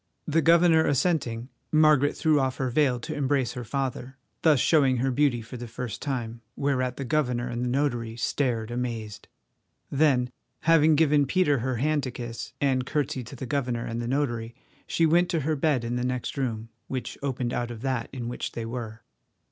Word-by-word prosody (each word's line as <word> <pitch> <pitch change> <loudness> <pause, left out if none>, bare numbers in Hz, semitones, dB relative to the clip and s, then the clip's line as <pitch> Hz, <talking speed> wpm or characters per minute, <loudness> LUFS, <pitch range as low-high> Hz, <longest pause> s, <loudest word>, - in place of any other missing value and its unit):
The 160 +1 +2
governor 165 0 +5
assenting, 130 -5 0 0.2
Margaret 155 -2 +4
threw 155 -2 +3
off 130 -1 0
her 130 -2 -1
veil 130 -2 +2
to 155 - -5
embrace 140 -4 0
her 125 -1 -6
father, 130 +1 -3 0.2
thus 155 -5 +5
showing 135 -4 +4
her 130 +2 +1
beauty 125 -3 +2
for 120 +3 -9
the 120 0 -7
first 120 0 -6
time, 120 -5 -3
whereat 130 -3 0
the 140 - -4
governor 125 -3 0
and 120 0 -3
the 125 - -1
notary 120 -4 -1
stared 120 -2 -1
amazed. 115 -4 -4 0.6
Then 135 -4 +2 0.3
having 160 -1 +5
given 150 -2 +3
Peter 145 -4 +2
her 130 +2 -1
hand 150 +5 +1
to 130 - -3
kiss, 115 -2 -6
and 130 -2 +2
curtseyed 130 -3 -2
to 135 - -9
the 130 - -6
governor 125 -3 -1
and 115 +1 -3
the 120 - -3
notary, 120 -4 -1 0.3
she 165 - +2
went 175 +3 +3
to 165 - 0
her 155 +3 0
bed 140 -4 +1
in 120 +1 -2
the 125 - -1
next 125 -1 -2
room, 115 -5 -3 0.2
which 130 -2 -4
opened 130 -3 -2
out 120 -1 -2
of 120 0 -8
that 130 -4 -1
in 120 -3 -5
which 120 - -4
they 115 - -4
were. 115 -2 -6
130 Hz, 190 wpm, -26 LUFS, 120-145 Hz, 0.6 s, governor